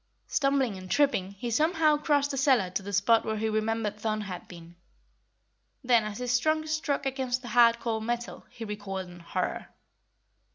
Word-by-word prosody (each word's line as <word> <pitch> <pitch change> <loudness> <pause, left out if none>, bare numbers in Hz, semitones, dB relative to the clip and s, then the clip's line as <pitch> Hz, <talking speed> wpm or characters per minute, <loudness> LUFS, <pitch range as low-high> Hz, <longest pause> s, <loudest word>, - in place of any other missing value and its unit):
Stumbling 275 -7 +1
and 185 0 -10
tripping, 235 -10 +1
he 235 +4 -5
somehow 310 +4 +3
crossed 290 -1 +1
the - - -3
cellar 255 -9 +3
to 185 - -2
the 200 +1 -7
spot 205 +4 +3
where 220 0 -2
he 220 +1 -1
remembered 215 -1 -1
Thun 215 -1 -1
had 190 -3 -7
been. 170 -1 -12 1.1
Then, 240 -3 +4
as 210 -1 -5
his 250 0 +1
trunk 310 +2 0
struck 310 -3 -1
against 260 -1 -2
hard 235 0 +4
cold 220 -2 -2
metal, 240 +1 -4
he 230 - -8
recoiled 195 -3 -5
in 175 0 -12
horror. 170 - -3
230 Hz, 170 wpm, -28 LUFS, 205-270 Hz, 1.1 s, Then